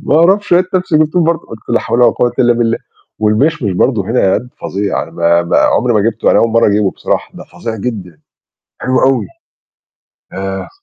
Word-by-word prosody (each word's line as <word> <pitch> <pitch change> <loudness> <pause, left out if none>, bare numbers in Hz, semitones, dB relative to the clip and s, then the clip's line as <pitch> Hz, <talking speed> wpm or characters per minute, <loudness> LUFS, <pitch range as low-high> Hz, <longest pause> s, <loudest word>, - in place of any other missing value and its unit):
ما 150 - +1
أعرفش، 190 +5 +2
لقيت 180 +2 +2
نَفْسي 180 -4 +1
جبتهم 155 +3 +2
برضه. 165 0 0
قَلت 110 - -10
لا 120 - +1
حول 120 - 0
ولا 120 - +6
قوة 120 -1 0
إلا 120 -1 +4
بالله. 115 -1 0 0.4
والمِشْمِش 110 - +1
برضه 105 +4 +1
هنا 100 -6 +2
Aldi 125 +2 -13
فظيع. 100 +1 -2
أنا - - -10
ما 85 0 +2
ما 85 - 0
عُمري 125 +1 +2
ما 105 - +3
جِبته، 115 0 0
أنا - - +4
أول 115 - +2
مرّة 115 0 +3
أجيبه 100 -1 +1
بصراحة، - - -3
ده - - -10
فظيع 115 -1 -7
جدًا. 95 -8 -6 0.6
حلو 130 0 +1
أوي. 130 -5 +2 1.1
آآ 95 0 -5
115 Hz, 195 wpm, -14 LUFS, 100-135 Hz, 1.1 s, ولا